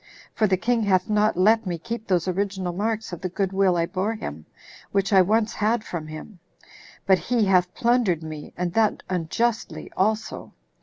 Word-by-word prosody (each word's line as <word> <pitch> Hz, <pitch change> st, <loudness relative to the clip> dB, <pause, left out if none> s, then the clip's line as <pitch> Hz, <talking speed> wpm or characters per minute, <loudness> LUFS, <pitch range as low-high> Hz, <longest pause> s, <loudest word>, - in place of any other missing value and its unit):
For 215 Hz, -, +2 dB
the 190 Hz, -1 st, +2 dB
king 235 Hz, +4 st, +1 dB
hath 190 Hz, -1 st, +1 dB
not 210 Hz, -2 st, +2 dB
let 220 Hz, +3 st, +4 dB
me 175 Hz, -2 st, -2 dB
keep 230 Hz, +5 st, -6 dB
those 180 Hz, -2 st, +1 dB
original 190 Hz, -1 st, -2 dB
marks 220 Hz, +2 st, -2 dB
of 175 Hz, -, -6 dB
the 185 Hz, -, -2 dB
good 195 Hz, +1 st, -2 dB
will 190 Hz, -2 st, +3 dB
I 165 Hz, -, +2 dB
bore 195 Hz, +6 st, -2 dB
him, 75 Hz, -, -7 dB, 0.4 s
which 195 Hz, 0 st, +1 dB
I 190 Hz, -, +8 dB
once 215 Hz, +4 st, +1 dB
had 215 Hz, +2 st, 0 dB
from 165 Hz, -7 st, -6 dB
him; 155 Hz, +5 st, -9 dB, 0.7 s
but 190 Hz, -1 st, +4 dB
he 235 Hz, -3 st, +1 dB
hath 180 Hz, -2 st, +3 dB
plundered 235 Hz, -9 st, +2 dB
me, 155 Hz, -2 st, -8 dB
and 175 Hz, -1 st, -2 dB
that 220 Hz, 0 st, +1 dB
unjustly 210 Hz, +7 st, -2 dB
also. 215 Hz, +4 st, -1 dB
195 Hz, 185 wpm, -24 LUFS, 180-220 Hz, 0.7 s, I